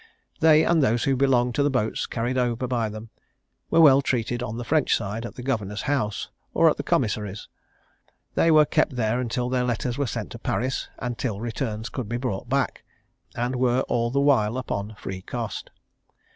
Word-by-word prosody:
They, 155 0 +6
and 170 -2 +3
those 120 -3 +2
who 135 - +2
belonged 125 -2 +2
to 140 - +1
the 145 - +3
boats 125 -5 -1
carried 120 +2 -2
over 125 -1 0
by 120 -3 -1
them, 110 +1 -9 0.6
were 165 - +5
well 140 -3 +7
treated 120 -2 -1
on 115 -2 -4
the 120 - -4
French 150 +4 +2
side 110 +2 -4
at - - -12
the 125 - -8
governor's 110 -6 -2
house, 120 -8 -1 0.2
or - - +5
at - - -3
the - - -2
commissary's: 105 -1 -1 0.9
they 165 - +3
were 155 -1 +6
kept 135 - +1
there 120 +1 0
till 120 +1 -2
their 125 0 0
letters 125 +1 -2
were 140 - +1
sent 110 -2 -4
to 120 - -8
Paris, 130 +3 -2
and 120 -2 -4
till 110 -6 -2
returns 115 -1 -3
could 125 -6 -5
be 120 - -1
brought 120 -3 -4
back, 135 -3 0 0.5
and 125 +2 -1
were 125 0 +2
all 120 -2 0
the 140 +3 0
while 125 -5 +3
upon 105 -4 -4
free 95 -2 -6
cost. - - -5
120 Hz, 195 wpm, -25 LUFS, 110-130 Hz, 0.9 s, well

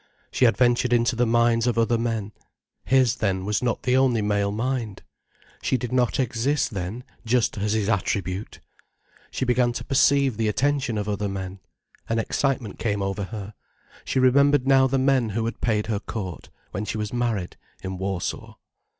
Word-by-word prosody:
She 130 - +3
adventured 120 +1 +2
into 120 +1 +2
the 120 +1 +2
minds 115 0 +3
of 120 - 0
other 115 0 +2
men. 115 -3 -2 0.5
His, 130 -2 +3
then, 95 -4 -1
was 105 0 0
not 120 -2 -1
the 125 0 +2
only 130 -4 +3
male 100 -1 +1
mind! 115 -1 -3 0.6
She 130 - +1
did 125 -1 -5
not 125 -1 +1
exist, 130 +3 0
then, 100 +6 -4 0.2
just 120 -1 +1
as 105 +1 0
his 110 -2 0
attribute! 100 -2 -2 0.7
She 130 - -2
began 125 -1 +2
to - - -5
perceive 135 -3 +3
the 110 -1 0
attention 135 +1 0
of 105 0 -2
other 105 0 -2
men. 95 0 -5 0.5
An 115 - 0
excitement 125 -1 -1
came 105 -3 -1
over 95 +1 -2
her. 100 +2 -7 0.5
She - - -2
remembered 140 +1 +4
now 135 -1 +5
the 135 +1 0
men 130 -3 +2
who 110 +2 -2
had 115 - -5
paid 110 -3 +1
her 110 -2 -1
court, 95 -5 -6 0.2
when 100 - -3
she 110 - -3
was 105 0 -4
married, 115 -7 -1 0.3
in 95 -1 -5
Warsaw. 95 -2 -4
115 Hz, 175 wpm, -24 LUFS, 105-125 Hz, 0.7 s, now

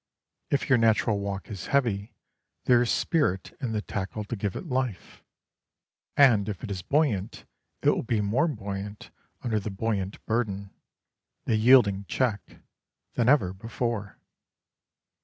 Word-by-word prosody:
If 140 - 0
your 130 -3 +4
natural 110 -1 +3
walk 100 +1 -5
is 95 -4 -6
heavy, 115 -7 0 0.5
there 120 -1 +5
is 120 - 0
spirit 145 - 0
in 125 -5 -2
the 105 -1 -2
tackle 105 +2 -4
to 105 - -4
give 100 -2 -3
it - - -5
life, 130 - -3 0.9
and 115 -7 +5
if 100 -4 -6
it 110 - -5
is 95 -2 -3
buoyant 120 - 0 0.4
it - - +5
will - - 0
be 115 -2 0
more 110 +11 +2
buoyant 100 -6 -6 0.3
under 110 -3 0
the 105 - -5
buoyant 100 -1 -3
burden 100 -4 -2 0.7
the 115 - +2
yielding 110 -4 +5
check 110 -1 -2 0.5
than 120 0 +2
ever 115 -11 +4
before. 115 +1 -4
110 Hz, 140 wpm, -27 LUFS, 100-120 Hz, 0.9 s, there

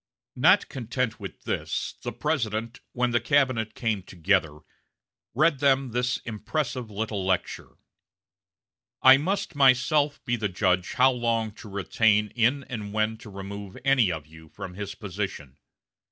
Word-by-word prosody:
Not - - +5
content 125 -1 -3
with - - -9
this, - - -3
the - - -4
President, 115 -5 -2
when 125 0 0
the 120 - +3
cabinet 130 -5 +1
came 110 -4 -1
together, 90 -4 0 0.7
read 150 +1 +3
them 135 -2 +2
this 125 +2 0
impressive 125 +2 -3
little 105 -1 -3
lecture: 95 -1 -2 1.3
"I 130 +1 +9
must 180 +5 -2
myself 145 +2 +3
be 120 -1 0
the 105 -3 -1
judge 90 -1 0
how 130 +1 +5
long 115 -3 -1
to 110 - -12
retain 105 +2 +2
in 125 +5 +1
and 105 -5 -6
when 110 +1 0
to 110 - -12
remove 100 0 -8
any 130 -8 +4
of 80 -3 -5
you 80 0 -15
from 90 - -8
his 100 +1 -6
position. 95 - -6
110 Hz, 140 wpm, -26 LUFS, 100-130 Hz, 1.3 s, I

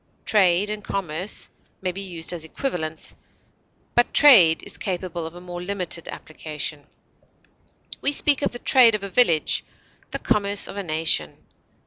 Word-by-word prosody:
Trade 195 -1 +3
and 210 -1 -5
commerce 185 -1 -2 0.3
may 185 -1 -2
be 195 +2 -6
used 175 -3 -3
as 170 -2 -5
equivalents, 160 - -5 0.8
but 240 - +2
trade 200 - +7
is - - -4
capable 175 -3 -4
of 165 - -11
a 175 - -10
more 175 -1 -7
limited 180 -3 -2
application; 150 -1 -7 1.1
we 280 - +1
speak 290 0 +3
of - - 0
the 240 - -6
trade 240 -3 +5
of 205 - -5
a 200 - -5
village, 180 -8 +2 0.5
the - - -3
commerce 200 -1 0
of - - -8
a 200 - -3
nation. 155 - 0
180 Hz, 150 wpm, -23 LUFS, 160-205 Hz, 1.1 s, trade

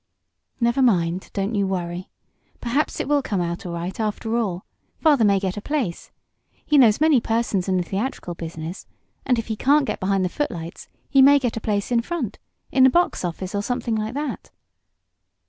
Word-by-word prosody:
"Never 235 +3 +2
mind, 180 -7 +2
don't 200 +2 -2
you 200 -2 +1
worry. 180 -1 -4 0.5
Perhaps 265 +6 -1
it - - -2
will 290 0 +3
come 205 -7 -2
out 170 +1 -3
all 170 - -5
right, 175 +4 -5
after 220 +1 -2
all. 195 -6 -1 0.3
Father 295 -7 +4
may 200 -2 +4
get 190 0 -3
a - - -4
place. 255 - -3 0.6
He 300 - +2
knows 225 -5 +5
many 305 -5 +4
persons 225 -5 0
in 185 - +2
the 180 - +1
theatrical 195 0 -3
business, 165 +1 -7 0.4
and 250 -2 +3
if 230 - -2
he 220 - -3
can't 280 +5 +3
get - - -3
behind 190 0 +1
the - - -1
footlights 175 - -4 0.2
he 275 - +4
may 285 +2 +8
get 250 -4 -1
a 225 - -4
place 205 +1 -1
in 235 -1 +3
front 255 - -4 0.3
in 265 - +4
the 260 - +8
box 345 - +1
office, 180 +2 -4
or 200 - 0
something 245 +1 -2
like 220 +3 -3
that." 290 -1 -4
215 Hz, 195 wpm, -23 LUFS, 185-260 Hz, 0.6 s, may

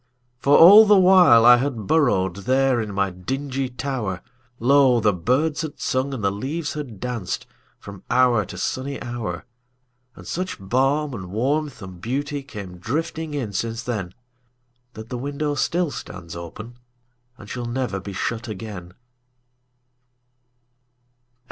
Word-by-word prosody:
For 140 +3 +4
all 205 +6 +9
the 205 -1 +6
while 180 -11 +6
I 120 0 +9
had 135 +1 -1
burrowedThere 125 - +2
in 105 - -6
my 100 -1 0
dingy 130 +8 -4
tower, 125 -8 -4 0.4
Lo! 130 0 +4
the 105 -2 +2
birds 130 - 0
had 155 -2 -6
sung 130 +2 -1
and 130 -6 -5
the 100 - +2
leaves 145 +10 -4
had 135 -10 -7
dancedFrom 100 -3 -7
hour 125 -4 +3
to 90 0 -10
sunny 135 +8 -3
hour. 120 -2 -5 0.7
And - - -13
such 185 +2 -4
balm 135 +8 0
and 95 -6 -6
warmth 130 +4 -2
and 90 -2 -10
beautyCame 130 -7 -5
drifting 155 - -3
in 120 -8 -3
since 115 +3 -3
then, 100 -7 -4 0.8
That 110 +1 -10
the 125 - -4
window 145 +2 -2
still 170 +3 0
stands 85 -8 -8
openAnd 95 +8 -8 0.7
shall 120 +3 -5
never 120 -5 -2
be 100 +1 -8
shut 115 +5 -3
again. 95 -4 -8
125 Hz, 130 wpm, -22 LUFS, 100-140 Hz, 0.8 s, all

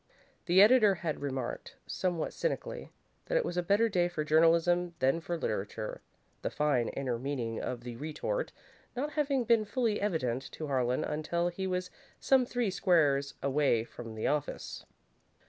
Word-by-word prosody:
The 185 +3 +7
editor 215 -3 +6
had 165 -5 -4
remarked, 135 -3 -4
somewhat 175 -3 -2
cynically, - - -3 0.4
that - - +1
it - - +1
was 175 - -3
a 180 - +2
better 200 +6 +3
day 180 -5 +2
for 165 -3 -3
journalism 170 +3 +3
than 135 +3 +2
for 170 +1 -3
literature, 105 -4 -3 0.4
the - - -1
fine, 140 -6 +1
inner 125 -4 -2
meaning 125 -4 -3
of 125 -2 -4
the 120 -1 -6
retort 160 - -3 0.4
not 285 +4 -2
having 280 -4 +1
been 230 -1 +4
fully 225 -1 0
evident 135 - -1
to 155 - -5
Harlan 125 -3 0
until 170 +3 -1
he 190 +2 -4
was 180 -1 -2 0.3
some 260 -2 +3
three 245 -5 0
squares 150 -7 +2
away 140 -4 +2
from 115 -1 -9
the 110 - -3
office. 150 0 -2
165 Hz, 160 wpm, -31 LUFS, 135-200 Hz, 0.4 s, The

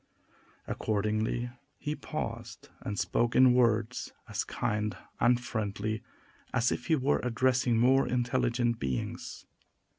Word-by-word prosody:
Accordingly, 110 +3 -1 0.3
he 150 - -3
paused, - - -6
and 105 - -4
spoke 120 +3 +1
in 130 -1 +7
words 115 -1 +2 0.2
as - - -2
kind 105 -2 -2 0.2
and 120 0 +4
friendly 110 -2 -3 0.5
as 120 +1 +3
if 120 - -3
he 160 - +4
were 140 0 +2
addressing 125 0 +2
more 130 +3 +4
intelligent 120 -1 +1
beings. 65 -1 -4
120 Hz, 115 wpm, -30 LUFS, 110-125 Hz, 0.5 s, in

